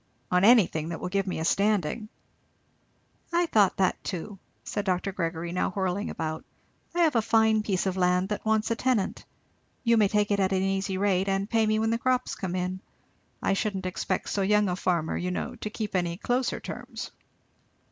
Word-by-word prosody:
"On 180 +1 +3
anything, 195 -8 +5
that 165 - -4
will - - -4
give 195 +1 0
me 185 - -2
a 160 - -2
standing." 205 +1 +1 1.2
"I 345 +1 +3
thought 210 - +3
that 190 -2 +1
too," 195 +1 -5 0.2
said 205 - -3
Dr. 190 0 0
Gregory, 170 -1 -3
now 180 - 0
whirling 190 +2 -2
about. 155 -1 -4 0.5
"I 350 - +2
have 315 -5 +3
a 230 - +4
fine 220 0 +3
piece 195 -3 -1
of 190 -1 -1
land 180 +1 +2
that 210 - -3
wants 220 0 +1
a - - +2
tenant. 230 -5 0 0.6
You 230 -1 +4
may 210 -2 +5
take 210 +1 +1
it 200 - +2
at 190 0 +2
an 190 0 +1
easy 195 0 -1
rate, 195 -1 +1
and 195 +1 0
pay 225 -1 +2
me 215 0 +2
when 220 +1 +1
the 230 - 0
crops 255 0 0
come 185 -2 -4
in. 185 +1 -2 0.6
I - - +2
shouldn't 195 -2 -2
expect 185 - -2
so 200 - 0
young 210 +1 +3
a 180 - 0
farmer, 175 -3 0
you 180 - -2
know, 180 - -3
to 215 - -5
keep 215 -2 -4
any 175 -2 0
closer 245 +5 -1
terms." - - -7
195 Hz, 200 wpm, -27 LUFS, 180-215 Hz, 1.2 s, anything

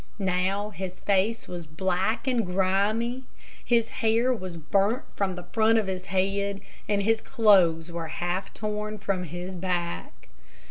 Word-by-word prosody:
Now 195 +2 0
his 185 -2 -6
face 200 +3 +1
was 175 -2 -6
black 190 +8 0
and 250 -3 +2
grimy, 200 +7 0 0.4
his 230 -2 +2
hair 230 +3 +3
was 185 -7 -6
burnt 200 - +1
from 190 -2 0
the 180 - -7
front 225 0 +4
of 220 - +2
his 185 -1 -4
head, 195 +1 0 0.3
and 200 -1 +2
his 225 +1 +2
clothes 180 -9 +4
were 170 -1 -4
half 175 +3 -2
torn 215 0 -3
from 190 -2 -2
his 175 +3 -6
back. 175 -1 -3
195 Hz, 145 wpm, -27 LUFS, 180-215 Hz, 0.4 s, front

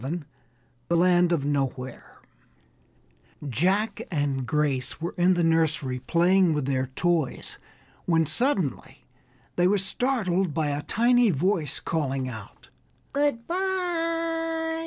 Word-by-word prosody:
_ 155 +6 -4 0.6
THE 170 - +2
LAND 175 0 +4
OF 155 -5 0
NOWHERE 135 -3 -3 1.3
Jack 185 - +1
and 140 -5 -1
Grace 145 -4 -1
were 170 +1 -4
in 180 +1 +3
the 175 - +1
nursery 160 -5 +1
playing 175 +4 +3
with 150 -3 -1
their 130 -1 0
toys, 160 +2 -2 0.5
when 165 -2 +3
suddenly 160 - -2 0.5
they 175 0 +4
were 205 +2 +3
startled 190 - -1
by 155 -2 0
a 145 0 -2
tiny 240 +5 +3
voice 170 -1 0
calling 135 -5 -2
out 110 -5 -10 0.4
"Good 280 -5 0
by!" 330 -3 -1
170 Hz, 115 wpm, -26 LUFS, 145-230 Hz, 1.3 s, LAND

